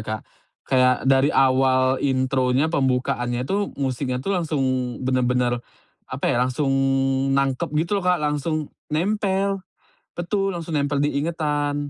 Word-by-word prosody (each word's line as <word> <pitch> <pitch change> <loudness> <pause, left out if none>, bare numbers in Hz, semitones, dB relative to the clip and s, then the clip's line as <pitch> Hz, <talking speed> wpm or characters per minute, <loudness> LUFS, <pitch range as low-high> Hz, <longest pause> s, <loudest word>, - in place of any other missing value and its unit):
Kak, 110 0 -4 0.4
kayak 125 -1 +3
dari 135 +1 +4
awal 130 -1 +3
intronya, 130 +2 +1
pembukaannya 125 -3 0
itu 200 +7 -2
musiknya 130 -1 -2
tuh 200 - 0
langsung 160 -6 -1 0.4
benar-benar 125 -1 +1 0.5
apa - - -5
ya, 120 - +1
langsung 130 +2 0 0.6
nangkep 135 -1 0
gitu 170 +6 +1
loh, - - -8
Kak. 180 - +4
Langsung 150 +1 -1 0.2
nempel. 195 +3 0 0.5
Betul, 195 +2 -1
langsung 165 -3 -3
nempel 140 0 0
di 145 -1 0
ingatan. 150 -2 -1
140 Hz, 125 wpm, -23 LUFS, 130-160 Hz, 0.6 s, dari